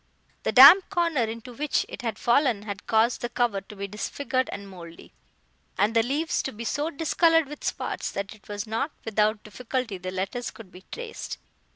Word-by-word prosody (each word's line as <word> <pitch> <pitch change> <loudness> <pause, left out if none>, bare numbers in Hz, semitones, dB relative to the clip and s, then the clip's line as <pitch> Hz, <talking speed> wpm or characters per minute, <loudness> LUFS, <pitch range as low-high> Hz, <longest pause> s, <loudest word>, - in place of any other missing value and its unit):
The - - -1
damp 300 +9 +9
corner 335 -9 +1
into 230 +2 -7
which 295 +4 0
it - - -8
had 230 -3 -3
fallen 240 -4 +2
had 200 -2 -7
caused 225 +2 +2
the 240 - -3
cover 240 -5 0
to 210 - -13
be 200 0 -5
disfigured 255 +5 -2
and 200 0 -7
mouldy, 170 -3 -12 0.6
and 215 +3 +2
the 230 - +6
leaves 295 +8 -1
to 270 - -4
be 230 0 -8
so 290 +6 -1
discoloured 325 +1 +2
with 295 +1 -10
spots, - - -3
that 200 +1 -4
it 215 - -20
was 205 +1 -4
not 225 +7 -2 0.2
without 215 -1 +1
difficulty 235 -2 -4
the 185 +1 -5
letters 190 +6 -3
could 210 -5 -13
be 185 +1 -14
traced. 475 -1 -6
230 Hz, 190 wpm, -26 LUFS, 205-275 Hz, 0.6 s, damp